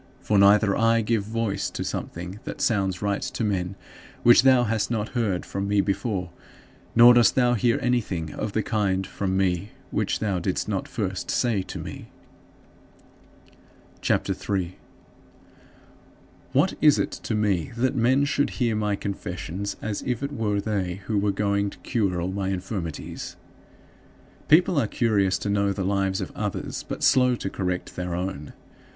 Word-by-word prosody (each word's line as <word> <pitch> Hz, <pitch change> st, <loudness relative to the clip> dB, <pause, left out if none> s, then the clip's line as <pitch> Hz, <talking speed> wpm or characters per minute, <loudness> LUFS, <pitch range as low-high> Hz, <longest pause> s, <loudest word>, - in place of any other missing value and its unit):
For 105 Hz, -2 st, +1 dB
neither 100 Hz, +2 st, +6 dB
do 100 Hz, -, +1 dB
I 115 Hz, 0 st, +3 dB
give 110 Hz, 0 st, +1 dB
voice 110 Hz, -1 st, -2 dB
to -, -, -4 dB
something 90 Hz, +4 st, -5 dB
that -, -, -7 dB
sounds 95 Hz, -5 st, 0 dB
right 100 Hz, -1 st, 0 dB
to -, -, -3 dB
men, 95 Hz, -3 st, -1 dB, 0.5 s
which 120 Hz, -1 st, +8 dB
thou 130 Hz, -1 st, +5 dB
hast 110 Hz, -2 st, 0 dB
not 110 Hz, -2 st, -1 dB
heard 110 Hz, -8 st, -1 dB
from 100 Hz, 0 st, -3 dB
me 100 Hz, 0 st, +2 dB
before, 100 Hz, -2 st, -1 dB, 0.6 s
nor 120 Hz, +1 st, +9 dB
dost 120 Hz, -2 st, +5 dB
thou 125 Hz, -2 st, +3 dB
hear 115 Hz, +1 st, +2 dB
anything 100 Hz, -10 st, -1 dB
of 105 Hz, -, -4 dB
the 110 Hz, -, 0 dB
kind 95 Hz, -3 st, 0 dB
from 95 Hz, 0 st, -2 dB
me 95 Hz, +1 st, 0 dB, 0.2 s
which -, -, 0 dB
thou 100 Hz, -4 st, -1 dB
didst -, -, -2 dB
not -, -, -2 dB
first -, -, -3 dB
say 115 Hz, -5 st, +1 dB
to -, -, -7 dB
me. -, -, -8 dB, 1.9 s
CHAPTER -, -, +1 dB
III -, -, -3 dB, 0.3 s
3. -, -, -23 dB, 1.8 s
What 150 Hz, +8 st, +3 dB
is 150 Hz, -2 st, +6 dB
it -, -, -1 dB
to 110 Hz, -, -4 dB
me 100 Hz, -7 st, 0 dB
that 130 Hz, +3 st, +1 dB
men 130 Hz, +4 st, +3 dB
should 145 Hz, 0 st, +1 dB
hear 120 Hz, -3 st, +1 dB
my 105 Hz, -1 st, 0 dB
confessions 95 Hz, 0 st, -4 dB
as 105 Hz, -2 st, -3 dB
if 125 Hz, +1 st, -2 dB
it 140 Hz, -, -2 dB
were 105 Hz, -5 st, 0 dB
they 100 Hz, -3 st, -2 dB
who 105 Hz, -2 st, 0 dB
were 100 Hz, 0 st, +1 dB
going 100 Hz, 0 st, 0 dB
to -, -, -13 dB
cure 100 Hz, -7 st, -1 dB
all 90 Hz, +2 st, -2 dB
my 95 Hz, 0 st, -2 dB
infirmities? 95 Hz, -3 st, -5 dB, 1.1 s
People 170 Hz, +1 st, +5 dB
are 110 Hz, -, 0 dB
curious 100 Hz, -5 st, +1 dB
to -, -, -4 dB
know 100 Hz, 0 st, +2 dB
the 100 Hz, -1 st, -3 dB
lives 95 Hz, -1 st, 0 dB
of -, -, -5 dB
others, -, -, -4 dB
but -, -, -5 dB
slow 125 Hz, -2 st, +4 dB
to 95 Hz, -, -5 dB
correct 90 Hz, -2 st, -3 dB
their 90 Hz, -1 st, -3 dB
own. 90 Hz, -5 st, -4 dB
100 Hz, 170 wpm, -25 LUFS, 95-115 Hz, 1.9 s, nor